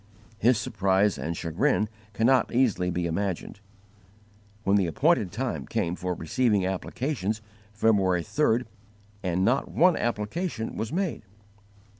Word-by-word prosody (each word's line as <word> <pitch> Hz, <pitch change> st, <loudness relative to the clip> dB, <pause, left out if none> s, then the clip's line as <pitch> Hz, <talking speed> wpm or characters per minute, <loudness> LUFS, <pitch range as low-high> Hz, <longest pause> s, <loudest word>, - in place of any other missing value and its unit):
His 120 Hz, +1 st, +4 dB
surprise 100 Hz, -4 st, +1 dB
and 80 Hz, +5 st, -3 dB
chagrin 105 Hz, -, +1 dB, 0.3 s
cannot 120 Hz, +3 st, +3 dB
easily 115 Hz, -8 st, +2 dB
be 90 Hz, 0 st, -1 dB
imagined, 95 Hz, +3 st, -3 dB, 1.0 s
when 100 Hz, 0 st, +3 dB
the 95 Hz, -3 st, +3 dB
appointed 115 Hz, -, +2 dB
time 110 Hz, -, -3 dB
came 85 Hz, +1 st, -1 dB
for 90 Hz, -1 st, -3 dB
receiving 100 Hz, +4 st, +1 dB
applications, 110 Hz, +3 st, -2 dB, 0.3 s
February 100 Hz, -5 st, +2 dB
3rd, 125 Hz, -, +1 dB, 0.6 s
and 90 Hz, 0 st, 0 dB
_not 130 Hz, +4 st, +2 dB
one 180 Hz, +1 st, +4 dB
application 115 Hz, -, -2 dB
was 110 Hz, 0 st, -3 dB
made! 185 Hz, 0 st, -1 dB
105 Hz, 120 wpm, -27 LUFS, 90-125 Hz, 1.0 s, His